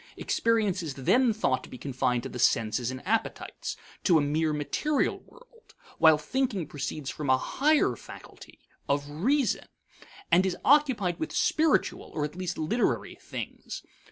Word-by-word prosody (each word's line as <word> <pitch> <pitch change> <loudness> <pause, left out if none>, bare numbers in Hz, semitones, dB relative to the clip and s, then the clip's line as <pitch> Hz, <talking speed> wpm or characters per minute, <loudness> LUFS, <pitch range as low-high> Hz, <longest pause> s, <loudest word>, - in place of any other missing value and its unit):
Experience 215 -5 +1
is 155 -5 -5
then 240 - +3
thought 130 - 0
to - - -11
be 125 - -9
confined 125 -2 -1
to - - -5
the 125 - -7
senses 115 +1 +2
and 130 +4 -7
appetites; 225 +2 -2 0.3
to 175 -4 +5
a - - +3
mere 155 +2 +1
material 210 - 0
world, 480 -1 -21 0.2
while 160 -2 +7
thinking 205 - -1
proceeds 145 0 -5
from 150 -3 -5
a 130 - +6
higher 295 - +2
faculty - - -13 0.3
(of 145 0 +1
reason), 235 - 0 0.7
and 180 - +6
is 185 -2 -1
occupied 260 -11 +3
with 320 - -3
spiritual 315 -1 +1
or 150 -2 0
at 150 - -7
least 180 -1 -4
literary 160 +10 0
things. - - -7
170 Hz, 155 wpm, -28 LUFS, -, 0.7 s, while